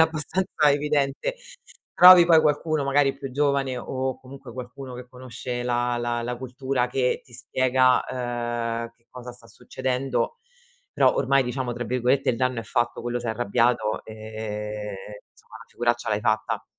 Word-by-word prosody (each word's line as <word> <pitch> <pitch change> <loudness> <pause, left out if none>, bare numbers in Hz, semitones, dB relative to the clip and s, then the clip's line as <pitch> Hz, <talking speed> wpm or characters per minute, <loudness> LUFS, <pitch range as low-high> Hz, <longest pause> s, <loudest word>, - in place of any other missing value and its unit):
abbastanza 160 0 +1
evidente. 145 - 0 0.6
Trovi 180 -1 +10
poi 165 -2 +6
qualcuno 155 0 +1
magari 140 0 +2
più 135 -1 -7
giovane 140 -1 0
o 130 0 -3
comunque 130 -2 -12
qualcuno 125 +1 -8
che 125 0 -9
conosce 125 -1 -6
la 120 0 0
la 120 0 -2
la 120 +1 -3
cultura 130 0 -2
che 125 0 0
ti 120 - -21
spiega, 130 +1 +2
ehm, 120 -2 -3
che 115 0 -39
cosa 125 -1 -9
sta 120 -1 -15
succedendo. 130 - -3 0.5
Però - - +4
ormai 135 0 +3
diciamo 125 0 -3
tra 120 +1 -5
virgolette 125 +3 +1
"il 115 - -2
danno 130 -1 0
è - - -7
fatto", 120 +1 -1
quello 120 +1 -2
s'è 120 - -4
arrabbiato, 115 -1 0
ehm, 105 -1 -6 0.4
insomma, - - -16
la - - -13
figuraccia 120 0 -1
l'hai 105 -1 0
fatta. 110 0 -1
125 Hz, 155 wpm, -24 LUFS, 120-135 Hz, 0.6 s, Trovi